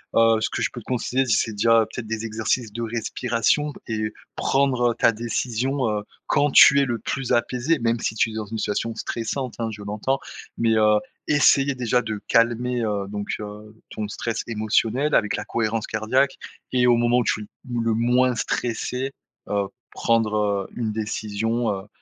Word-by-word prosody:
Heu, 115 Hz, 0 st, +5 dB
ce -, -, 0 dB
que -, -, -3 dB
je -, -, +1 dB
peux 120 Hz, -, -8 dB
te -, -, -20 dB
considérer, 130 Hz, +1 st, 0 dB
c'est 110 Hz, -1 st, +1 dB
déjà 115 Hz, +2 st, +4 dB
peut-être 115 Hz, +1 st, -7 dB
des 110 Hz, 0 st, -3 dB
exercices 110 Hz, 0 st, -1 dB
de 115 Hz, -, -4 dB
respiration 115 Hz, +4 st, 0 dB
b -, -, -12 dB
et 110 Hz, -1 st, -2 dB, 0.2 s
prendre 130 Hz, -3 st, +2 dB
ta 115 Hz, -, +3 dB
décision, 120 Hz, +3 st, -1 dB
heu, 105 Hz, -1 st, -2 dB, 0.2 s
quand 145 Hz, 0 st, +2 dB
tu 140 Hz, +1 st, +8 dB
es -, -, +2 dB
le 120 Hz, -4 st, -2 dB
plus 135 Hz, +3 st, -3 dB
apaisé 125 Hz, +6 st, +1 dB
même 115 Hz, -1 st, 0 dB
si 110 Hz, -, -1 dB
tu 110 Hz, 0 st, +1 dB
es -, -, -9 dB
dans 110 Hz, -1 st, -4 dB
une 110 Hz, +2 st, -5 dB
situation 110 Hz, +2 st, -2 dB
stressante 125 Hz, +2 st, -3 dB
hein, 115 Hz, -1 st, -1 dB
je 105 Hz, -1 st, -9 dB
l'entends. 105 Hz, +7 st, -1 dB, 0.4 s
Mais, 115 Hz, -1 st, +2 dB
heu, 105 Hz, -1 st, +4 dB, 0.3 s
essayer 140 Hz, -1 st, +4 dB
déjà 125 Hz, -1 st, +1 dB
de 110 Hz, -3 st, -4 dB
calmer, 120 Hz, +1 st, +2 dB
heu, 100 Hz, -3 st, -1 dB
donc, 100 Hz, 0 st, -5 dB
heu, 105 Hz, 0 st, -9 dB, 0.2 s
ton 105 Hz, -1 st, -5 dB
stress 115 Hz, +2 st, -3 dB
émotionnel 115 Hz, +5 st, +1 dB
avec 105 Hz, -, +2 dB
la -, -, -5 dB
cohérence 110 Hz, -1 st, -1 dB
cardiaque 130 Hz, +6 st, +1 dB, 0.4 s
et 125 Hz, -1 st, +3 dB
au 120 Hz, -1 st, +5 dB
moment 120 Hz, +1 st, +3 dB
où -, -, +1 dB
tu -, -, 0 dB
l -, -, -12 dB, 0.3 s
où 120 Hz, -, 0 dB
le 115 Hz, -1 st, +1 dB
moins 125 Hz, +2 st, +2 dB
stressé, 125 Hz, +4 st, -2 dB, 0.4 s
heu, 100 Hz, -1 st, 0 dB, 0.2 s
prendre 105 Hz, -3 st, +1 dB
une 115 Hz, -3 st, -2 dB
décision, 110 Hz, +2 st, -1 dB
heu, 95 Hz, 0 st, -5 dB
115 Hz, 185 wpm, -23 LUFS, 110-125 Hz, 0.4 s, tu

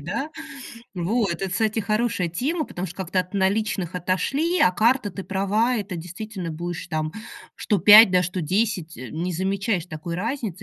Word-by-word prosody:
да? 205 Hz, -, -4 dB, 0.6 s
Вот, 195 Hz, +4 st, 0 dB
это, 190 Hz, +3 st, -4 dB
кстати, 220 Hz, +4 st, 0 dB
хорошая 215 Hz, -3 st, 0 dB
тема, 290 Hz, -, -1 dB
потому 180 Hz, -6 st, -5 dB
что 175 Hz, -, -10 dB
как-то 185 Hz, 0 st, -1 dB
от 180 Hz, +1 st, -8 dB
наличных 195 Hz, -2 st, 0 dB
отошли, 275 Hz, -, 0 dB
а 180 Hz, -, +5 dB
карта, 230 Hz, +1 st, +2 dB
ты 195 Hz, +2 st, -7 dB
права, 210 Hz, +6 st, +1 dB
это 205 Hz, -4 st, -4 dB
действительно 180 Hz, +2 st, -6 dB
будешь 170 Hz, +2 st, -5 dB
там, 155 Hz, -1 st, -2 dB, 0.4 s
что 205 Hz, -, 0 dB
5, 210 Hz, +3 st, +9 dB
да, 180 Hz, -1 st, +3 dB
что 180 Hz, +2 st, -3 dB
10, 180 Hz, -1 st, -1 dB
э, 130 Hz, -, -8 dB
не 175 Hz, +3 st, -3 dB
замечаешь 190 Hz, +1 st, -1 dB
такой 170 Hz, +1 st, -6 dB
разницы. 210 Hz, -, -3 dB
190 Hz, 170 wpm, -23 LUFS, 175-220 Hz, 0.6 s, 5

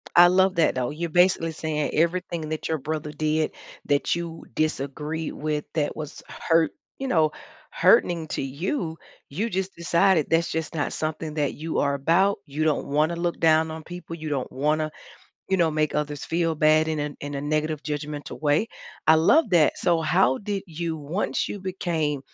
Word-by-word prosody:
I 175 Hz, 0 st, +9 dB
love 185 Hz, 0 st, +3 dB
that, 165 Hz, -, +3 dB
though. 125 Hz, -1 st, -1 dB
You're 165 Hz, +3 st, -4 dB
basically 175 Hz, -1 st, +3 dB
saying 155 Hz, -2 st, -2 dB
everything 170 Hz, -1 st, 0 dB
that 155 Hz, -, -3 dB
your 160 Hz, -, 0 dB
brother 150 Hz, +1 st, -4 dB
did 155 Hz, +1 st, 0 dB, 0.3 s
that 145 Hz, +3 st, +1 dB
you 170 Hz, -1 st, -6 dB
disagree 155 Hz, +1 st, -2 dB
with 150 Hz, 0 st, -3 dB
that 150 Hz, -2 st, -1 dB
was 155 Hz, -1 st, -7 dB
hurt 165 Hz, -2 st, +1 dB, 0.3 s
you 270 Hz, -, -3 dB
know, 160 Hz, -9 st, +3 dB, 0.4 s
hurting 170 Hz, -8 st, +3 dB
to -, -, -3 dB
you, 160 Hz, -, -3 dB, 0.3 s
you 205 Hz, +11 st, -2 dB
just 190 Hz, 0 st, -2 dB
decided 170 Hz, -1 st, +2 dB
that's 165 Hz, +1 st, +2 dB
just 160 Hz, 0 st, -3 dB
not 145 Hz, -, -1 dB
something 155 Hz, 0 st, -3 dB
that 145 Hz, -3 st, 0 dB
you 160 Hz, +1 st, -3 dB
are 140 Hz, 0 st, +2 dB
about, 175 Hz, +9 st, +2 dB
you 155 Hz, +1 st, -2 dB
don't 155 Hz, -, +1 dB
wanna 155 Hz, +4 st, +1 dB
look 170 Hz, 0 st, -2 dB
down 160 Hz, 0 st, +4 dB
on 160 Hz, 0 st, -6 dB
people, 175 Hz, -1 st, -8 dB
you 155 Hz, -1 st, -6 dB
don't 140 Hz, -4 st, -2 dB
wanna, 155 Hz, +3 st, 0 dB, 0.6 s
you 190 Hz, -, +2 dB
know, 165 Hz, -3 st, +2 dB
make 155 Hz, 0 st, 0 dB
others 150 Hz, -1 st, -2 dB
feel 165 Hz, -1 st, 0 dB
bad 155 Hz, +1 st, +4 dB
in 155 Hz, -1 st, -1 dB
a 145 Hz, 0 st, -2 dB
in 145 Hz, 0 st, -5 dB
a 140 Hz, -, -2 dB
negative 155 Hz, +1 st, -1 dB
judgmental 150 Hz, 0 st, -5 dB
way. 150 Hz, +8 st, +2 dB, 0.4 s
I 160 Hz, -, +8 dB
love 215 Hz, -, +4 dB
that, 160 Hz, -5 st, +4 dB
so 170 Hz, -2 st, +2 dB
how 130 Hz, -4 st, +3 dB
did 200 Hz, -2 st, -3 dB
you 165 Hz, 0 st, -3 dB
once 155 Hz, +7 st, -2 dB
you -, -, -5 dB
became 165 Hz, -6 st, -1 dB
160 Hz, 185 wpm, -25 LUFS, 150-170 Hz, 0.6 s, I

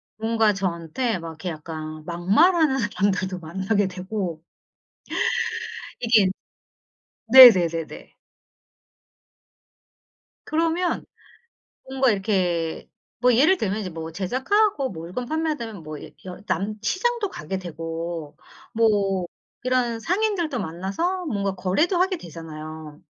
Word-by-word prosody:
뭔가 220 Hz, -1 st, +2 dB
저한테 190 Hz, +4 st, -2 dB
막 165 Hz, -, -7 dB
이렇게 160 Hz, +3 st, -6 dB
약간 155 Hz, -1 st, -7 dB
막말하는 270 Hz, -, +3 dB
사람들도 195 Hz, -4 st, -1 dB
만나게 190 Hz, +5 st, -1 dB
되고 185 Hz, -3 st, -4 dB, 1.6 s
이게 225 Hz, -5 st, +4 dB, 1.0 s
네네네네. 180 Hz, -11 st, +7 dB, 2.3 s
그러면 330 Hz, +3 st, 0 dB, 0.8 s
뭔가 265 Hz, -1 st, +2 dB
이렇게 185 Hz, -5 st, -1 dB, 0.3 s
뭐 250 Hz, -1 st, +4 dB
예를 315 Hz, +10 st, +5 dB
들면 210 Hz, -, -2 dB
이제 185 Hz, -3 st, -4 dB
뭐 160 Hz, 0 st, -7 dB
제작하고 270 Hz, -, +1 dB
뭐 165 Hz, -3 st, -8 dB
물건 240 Hz, +9 st, -5 dB
판매되면 295 Hz, -, -3 dB
뭐 155 Hz, -1 st, -7 dB, 0.3 s
여 180 Hz, +1 st, -8 dB
남 205 Hz, +2 st, -1 dB
시장도 435 Hz, -, 0 dB
가게 185 Hz, +6 st, -5 dB
되고 165 Hz, -2 st, -6 dB, 0.4 s
뭐 200 Hz, -5 st, +2 dB, 0.4 s
이런 250 Hz, -2 st, +1 dB
상인들도 360 Hz, -, 0 dB
만나서 200 Hz, -, -2 dB
뭔가 200 Hz, -6 st, -1 dB
거래도 195 Hz, -, +1 dB
하게 375 Hz, 0 st, +2 dB
되잖아요. 155 Hz, -, -9 dB
195 Hz, 230 characters per minute, -24 LUFS, 170-260 Hz, 2.3 s, 네네네네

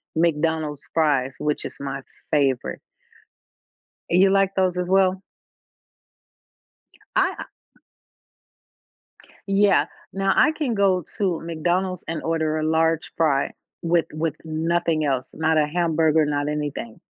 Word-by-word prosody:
McDonald's 160 Hz, -2 st, 0 dB
fries, 140 Hz, -5 st, +1 dB
which 150 Hz, 0 st, -1 dB
is -, -, -5 dB
my 135 Hz, 0 st, -4 dB, 0.3 s
favorite. 135 Hz, -4 st, +1 dB, 1.3 s
You 190 Hz, +3 st, +5 dB
like 195 Hz, 0 st, +2 dB
those 185 Hz, -1 st, +2 dB
as 180 Hz, 0 st, -2 dB
well? 190 Hz, -1 st, +3 dB, 1.9 s
I, -, -, +3 dB
uh -, -, -5 dB, 2.0 s
Yeah, 195 Hz, -6 st, +4 dB, 0.3 s
now 195 Hz, 0 st, +1 dB
I 305 Hz, -, +4 dB
can 285 Hz, -7 st, -2 dB
go 190 Hz, -3 st, +2 dB
to 185 Hz, -5 st, 0 dB
McDonald's 175 Hz, +3 st, -1 dB
and 165 Hz, -1 st, -3 dB
order 160 Hz, -1 st, 0 dB
a 155 Hz, -, -1 dB
large 160 Hz, 0 st, +1 dB
fry 145 Hz, -4 st, +1 dB, 0.3 s
with 170 Hz, 0 st, +2 dB
with 155 Hz, 0 st, -2 dB
nothing 160 Hz, 0 st, 0 dB
else, 130 Hz, -3 st, -2 dB
not 160 Hz, 0 st, +1 dB
a 150 Hz, -, +3 dB
hamburger, 160 Hz, -1 st, +2 dB
not 145 Hz, 0 st, -1 dB
anything. 145 Hz, -6 st, -4 dB
160 Hz, 120 wpm, -23 LUFS, 150-180 Hz, 2.0 s, You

